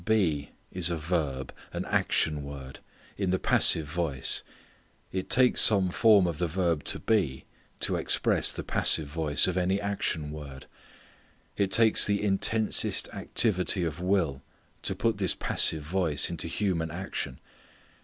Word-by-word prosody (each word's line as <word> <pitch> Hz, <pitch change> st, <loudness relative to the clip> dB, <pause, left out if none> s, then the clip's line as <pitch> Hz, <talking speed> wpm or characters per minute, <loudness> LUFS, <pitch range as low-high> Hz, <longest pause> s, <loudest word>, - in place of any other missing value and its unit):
Be 85 Hz, -9 st, 0 dB, 0.2 s
is 90 Hz, -2 st, +1 dB
a 85 Hz, -, -2 dB
verb, 75 Hz, -5 st, -3 dB, 0.2 s
an -, -, -5 dB
action 75 Hz, -2 st, 0 dB
word, 70 Hz, -2 st, -9 dB, 0.4 s
in 95 Hz, -2 st, -1 dB
the 95 Hz, -, +1 dB
passive 80 Hz, -3 st, +4 dB
voice. 75 Hz, -3 st, 0 dB, 0.7 s
It 95 Hz, 0 st, -5 dB
takes 125 Hz, -1 st, +4 dB
some 95 Hz, -4 st, +5 dB
form 105 Hz, -1 st, +4 dB
of 85 Hz, -3 st, -3 dB
the 90 Hz, -, 0 dB
verb 85 Hz, -2 st, -1 dB
to -, -, -1 dB
be 95 Hz, -13 st, -1 dB, 0.4 s
to -, -, +1 dB
express -, -, +2 dB
the -, -, -6 dB
passive 80 Hz, -, +2 dB
voice 75 Hz, 0 st, 0 dB
of 95 Hz, -1 st, -2 dB
any 95 Hz, +2 st, 0 dB
action 95 Hz, -7 st, -3 dB
word. 70 Hz, -3 st, -10 dB, 0.9 s
It 100 Hz, -1 st, -1 dB
takes 110 Hz, +2 st, +4 dB
the 100 Hz, -1 st, +1 dB
intensest 105 Hz, +2 st, +1 dB
activity 95 Hz, -4 st, 0 dB
of 80 Hz, -1 st, -4 dB
will 90 Hz, -7 st, -1 dB, 0.4 s
to -, -, -1 dB
put 115 Hz, -3 st, -1 dB
this 95 Hz, -3 st, +2 dB
passive 80 Hz, -2 st, +1 dB
voice 80 Hz, -3 st, 0 dB
into 85 Hz, 0 st, -4 dB
human 85 Hz, -2 st, -2 dB
action. 85 Hz, -6 st, -5 dB
85 Hz, 145 wpm, -27 LUFS, 75-95 Hz, 0.9 s, some